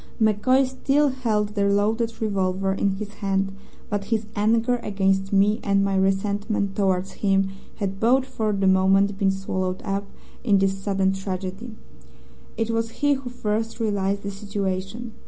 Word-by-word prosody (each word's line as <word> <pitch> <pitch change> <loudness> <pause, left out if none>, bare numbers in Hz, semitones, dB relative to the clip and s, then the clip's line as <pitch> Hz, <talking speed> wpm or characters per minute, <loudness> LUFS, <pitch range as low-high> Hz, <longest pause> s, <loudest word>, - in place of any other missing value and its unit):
MacCoy 225 +5 +3
still 275 +3 +1
held 225 -6 0
the 205 -1 -1
loaded 220 +3 +1
revolver 195 -2 0
in 195 0 0
his 210 +1 -6
hand, 195 -1 0 0.4
but 205 -1 -2
his 220 0 -1
anger 225 +3 +2
against 195 -3 0
me 205 +3 +3
and 195 -1 +2
my 195 -1 0
resentment 200 +1 0
towards 190 -2 +1
him 195 -1 +2 0.3
had 195 -2 -3
both 255 +4 +3
for 225 -5 -2
the 195 -1 0
moment 190 +1 +4
been 195 -2 +3
swallowed 190 -1 -2
up 200 0 -2 0.4
in 205 -5 +4
this 195 0 +2
sudden 195 -1 0
tragedy. 195 +4 -5 0.8
It 225 0 0
was 230 0 0
he 290 0 +5
who 265 -2 -4
first 225 -1 -2
realized 200 -2 0
the 200 - -3
situation. 200 +3 -4
200 Hz, 155 wpm, -24 LUFS, 195-225 Hz, 0.8 s, he